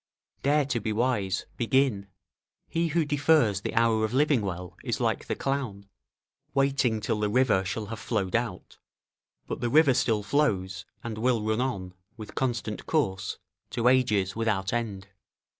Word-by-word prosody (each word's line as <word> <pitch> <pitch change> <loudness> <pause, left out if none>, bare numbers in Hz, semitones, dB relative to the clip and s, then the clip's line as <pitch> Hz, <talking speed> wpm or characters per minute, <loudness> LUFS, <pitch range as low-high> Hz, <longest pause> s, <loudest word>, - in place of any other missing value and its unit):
["Dare 145 +1 +3
to 130 -4 -1
be 110 0 -2
wise; 105 -5 0
begin! 120 -4 +1 0.6
he 165 0 0
who 165 0 +1
defers 145 -8 +3
the - - -4
hour 115 -1 +3
of 110 +3 -1
living 145 -3 +3
well 90 -3 -5
is - - -2
like - - 0
the - - -1
clown, 130 -8 -3 0.7
waiting 135 -4 +2
till 105 +1 -1
the 105 0 +1
river 115 -4 +3
shall 105 +4 -3
have 110 +1 -6
flowed 105 -5 -1
out: 115 -6 -3 0.7
but - - -5
the 120 - 0
river 145 0 +5
still 110 -3 +1
flows, 95 -9 0 0.2
and 110 -2 -5
will 120 -2 +1
run 110 +2 0
on, 95 -8 -3 0.2
with 110 -2 -9
constant 120 -5 -2
course, 105 - 0 0.3
to 120 0 0
ages 110 -7 +3
without 110 -4 0
end." 100 -5 -3
115 Hz, 160 wpm, -27 LUFS, 100-130 Hz, 0.7 s, river